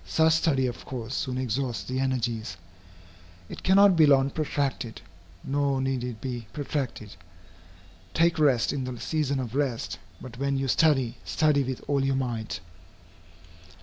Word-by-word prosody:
Such 160 0 +3
study 150 -5 +2
of 120 -1 -4
course 125 -1 -6
soon 130 -2 -2
exhausts 125 -4 -2
the 130 +5 -3
energies. 120 -8 -1 0.9
It - - -8
cannot 195 0 +6
be 160 -2 +6
long 140 -1 +4
protracted, 140 -6 -2 0.4
nor 140 -1 0
need 130 -2 -1
it 120 -3 -5
be 120 -3 -5
protracted. 135 -7 -4 1.0
Take 165 0 +3
rest 135 -7 +3
in 135 -2 -2
the 125 -2 -5
season 145 -4 -1
of 120 -3 -4
rest; 135 -4 -1 0.2
but, 125 -1 -10
when 140 0 0
you 135 0 -1
study, 130 -4 +2
study 150 -2 +2
with 130 -1 -4
all 140 -2 +1
your 135 0 +1
might. 120 -4 -3
135 Hz, 150 wpm, -27 LUFS, 125-145 Hz, 1.0 s, cannot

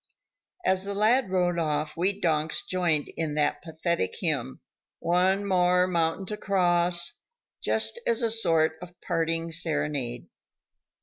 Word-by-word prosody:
As 190 0 +2
the 200 0 -5
lad 220 +3 +3
rode 180 -2 +1
off 150 -1 -1
we 190 +4 0
donks 160 -3 0
joined 170 -5 0
in 155 -2 -2
that 150 -1 0
pathetic 160 - -2
hymn: 65 - -1 0.4
"One 185 +3 +1
more 180 -1 +3
mountain 170 +1 -1
to 210 +2 -5
cross," 175 -3 +2 0.4
just - - +1
as 235 +1 +1
a 230 - +1
sort 165 -7 +2
of 175 0 -12
parting 165 -1 -1
serenade. 150 -7 -2
175 Hz, 130 wpm, -26 LUFS, 160-185 Hz, 0.4 s, lad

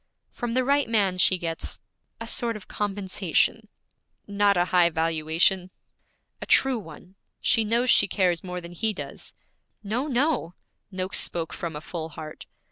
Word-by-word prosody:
'From 240 -1 -4
the 255 0 +2
right 280 -2 +2
man 200 -5 +1
she 185 - +5
gets 165 -2 -3 0.4
a 230 - -6
sort 230 0 -1
of 210 - -10
compensation.' 205 +1 -1 0.6
'Not 205 -1 +2
a 175 - +3
high 175 -1 +6
valuation.' 165 +3 +1 0.7
'A - - -4
true 265 -3 +3
one; 180 0 -13 0.3
she 225 -2 +3
knows 235 +3 +3
she 200 - +7
cares 180 -3 +1
more 180 -1 -5
than 170 0 -10
he 215 +5 -1
does.' - - -8 0.5
'No, 230 +8 -2
no!' 255 - 0 0.3
Noakes 185 -1 -2
spoke 165 -2 -1
from 165 -3 -5
a 150 - -6
full 160 0 -6
heart. 155 -1 -10
190 Hz, 155 wpm, -25 LUFS, 170-225 Hz, 0.7 s, she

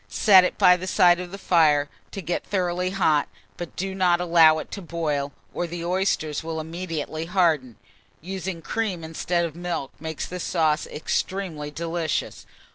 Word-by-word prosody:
Set 195 -4 +6
it 180 - -1
by 180 0 +6
the 180 +1 -6
side 175 -1 +5
of 180 -1 -6
the 195 - -8
fire 155 -6 +3 0.2
to 195 - -7
get 175 - -2
thoroughly 180 -2 -1
hot, 160 -6 +2 0.3
but 175 -2 -7
do 190 +1 -3
not 180 -2 +2
allow 165 -3 +5
it - - -7
to 200 - -6
boil, 155 -5 -2 0.2
or 175 - -2
the 170 0 -5
oysters 175 -5 0
will 160 0 -4
immediately 160 -1 -4
harden. 165 - +1 0.4
Using 185 -1 -5
cream 200 -6 -2
instead 170 +2 -1
of 165 -2 -6
milk 175 -6 -4
makes 160 -1 -4
this 180 -1 -5
sauce 155 -3 +1
extremely 160 -1 -3
delicious. 165 +1 -3
170 Hz, 165 wpm, -24 LUFS, 160-180 Hz, 0.4 s, Set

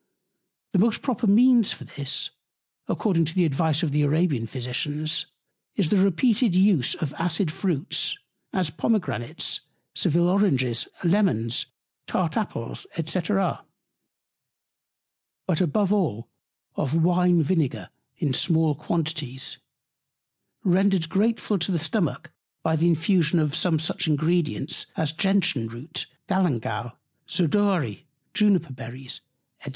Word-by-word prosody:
The 190 - +3
most 220 +3 +2
proper 245 -4 -1
Means 235 +1 +5
for - - -10
this, 140 -1 -2 0.6
according 175 -6 +1
to 165 - -4
the 180 -2 +3
Advice 160 +2 +1
of 155 - 0
the 150 +1 +2
Arabian 145 -5 +1
Physicians, 145 +6 -2 0.5
is 190 -7 +1
the 205 - +3
repeated 200 +3 +3
Use 185 -8 +3
of 150 -3 -4
acid 165 0 +1
Fruits, 170 -1 -1 0.3
as 180 -5 -1
Pomegranates, 160 - -1 0.3
Sevil 170 +3 +2
Oranges, 135 - +2 0.2
Lemons, 170 - +1 0.4
tart - - -1
Apples, - - -3 0.2
&c. 175 +3 0
But 195 +2 0 2.0
above 190 +4 +2
all 145 - -1 0.5
of 135 - -1
Wine 180 -1 +3
Vinegar 155 -4 -1 0.3
in 140 - 0
small 160 +2 +2
Quantities, 150 -3 -3 1.0
rendered 190 -2 +2
grateful 210 +1 +1
to 175 - -1
the 175 - +1
Stomach 160 -1 -1 0.3
by 160 0 +2
the 165 +2 +2
Infusion 170 0 +2
of 150 -3 +1
some 165 0 +2
such 155 +1 -1
Ingredients 155 -1 0
as 155 -2 +1
Gentian 180 - +1
Root, 125 +9 -5 0.2
Galangal, 120 - -1 0.4
Zedoary, 175 - 0 0.3
Juniper 190 -9 +2
Berries, 130 +2 -8 0.4
&c. 140 - -6
165 Hz, 115 wpm, -25 LUFS, 145-190 Hz, 2.0 s, Means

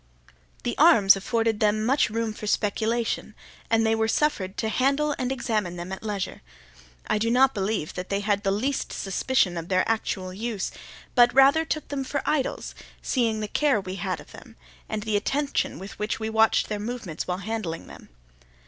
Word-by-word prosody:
The - - -2
arms 200 -3 +7
afforded 225 +2 0
them 215 0 +2
much 270 +5 +3
food 225 0 -2
for 210 - -6
speculation, 220 +3 -1 0.3
and 225 0 +3
they 220 - +3
were 225 0 +1
suffered 220 -8 0
to 220 - -1
handle 275 +6 +1
and 255 0 -1
examine 220 -8 -1
them 175 +1 -6
at 190 - -5
leisure. 205 -3 -4 0.6
I 215 - 0
do 230 +2 +1
not 260 +3 +4
believe 195 -5 -2
that 180 0 -6
they 200 0 0
had 205 -1 +1
the 195 - 0
least 255 +8 -1
suspicion 195 -1 0
of 165 0 -5
their 185 0 +2
actual 190 -4 -2
use, 215 0 -3 0.4
but 245 -1 +6
rather 275 +4 +6
took 310 -1 -3
them 280 -2 -2
for 275 +1 -3
idols, 290 -4 -1 0.3
seeing 230 -4 0
the 210 - -2
care 280 +1 +2
we 190 0 -6
had 185 -3 -2
of - - -14
them, - - -13 0.3
and 215 -1 -3
the 215 -1 -1
attention 280 +7 -1
with 195 +2 -9
which 210 +1 -2
we 220 0 -3
watched 220 0 +3
their 210 -1 -3
movements 210 -7 -5
while 180 0 -1
handling 200 -5 -4
them. - - -13
220 Hz, 185 wpm, -25 LUFS, 195-245 Hz, 0.6 s, arms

